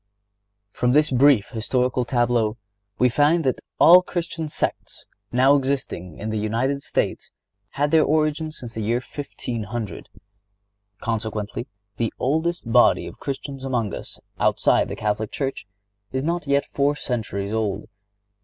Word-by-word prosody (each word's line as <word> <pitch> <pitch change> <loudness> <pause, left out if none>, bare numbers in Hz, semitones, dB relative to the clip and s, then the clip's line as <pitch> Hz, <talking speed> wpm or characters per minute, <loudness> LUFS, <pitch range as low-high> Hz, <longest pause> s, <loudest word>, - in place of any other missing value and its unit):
Church - - -24
From 125 - +3
this 150 +1 +4
brief 130 -4 +4
historical 125 +2 0
tableau 120 -3 +1 0.4
we 125 - +4
find 150 +7 +3
that 130 -2 0 0.2
all 175 +2 +9
the - - +4
Christian 165 -3 -4
sects - - -3 0.3
now 130 +3 +5
existing 130 - -2
in 110 +1 -4
the 110 - -1
United 120 +6 0
States - - -2 0.4
had 145 +1 0
their 160 -1 +5
origin 155 +1 +1
since 120 -7 -8
the 110 - -4
year 115 +3 +1
1500. 120 -5 -6 0.9
Consequently, 110 0 -3 0.3
the 115 -2 0
oldest 160 +5 0
body 120 +1 +5
of - - -10
Christians 135 -1 -5
among 120 -6 -1
us, - - -7 0.2
outside - - +3
the - - -4
Catholic 105 0 -2
Church, 135 -7 -3 0.4
is 130 0 -2
not 170 0 -2
yet 140 0 +2
four 140 +1 0
centuries 110 -7 -3
old. 105 -2 -1
125 Hz, 145 wpm, -23 LUFS, 110-145 Hz, 0.9 s, all